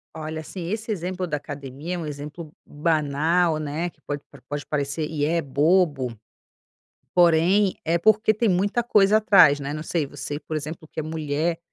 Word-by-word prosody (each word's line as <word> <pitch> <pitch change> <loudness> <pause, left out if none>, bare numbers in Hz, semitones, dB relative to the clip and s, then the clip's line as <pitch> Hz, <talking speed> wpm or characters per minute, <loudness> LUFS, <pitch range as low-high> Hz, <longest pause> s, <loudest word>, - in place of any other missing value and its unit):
Olha, 155 0 -5
assim, 170 +2 -7
esse 220 +2 -3
exemplo 180 -1 -3
da 150 - -1
academia 145 +3 -6
é - - -3
um 170 - -4
exemplo 150 +2 -7
banal, 155 +2 +1
né, 155 +4 -3
que - - -28
pode 145 -1 -5 0.3
pode 145 0 -4
parecer 145 +1 -2
e 150 -2 -1
é 165 +2 +1
bobo, 145 -4 +1 1.0
porém, 180 +3 +4
é 165 +2 +2
porque 215 +3 +4
tem 220 +2 0
muita 200 +5 +1
coisa 210 -3 +4
atrás, 190 -9 +6
né, 140 0 -4
não 155 +1 -4
sei 160 -2 -1
você, 145 +1 -6
por 155 +1 -5
exemplo, 155 +2 -6
que 155 - -6
é - - -3
mulher, 155 +1 -2
160 Hz, 175 wpm, -24 LUFS, 145-180 Hz, 1.0 s, atrás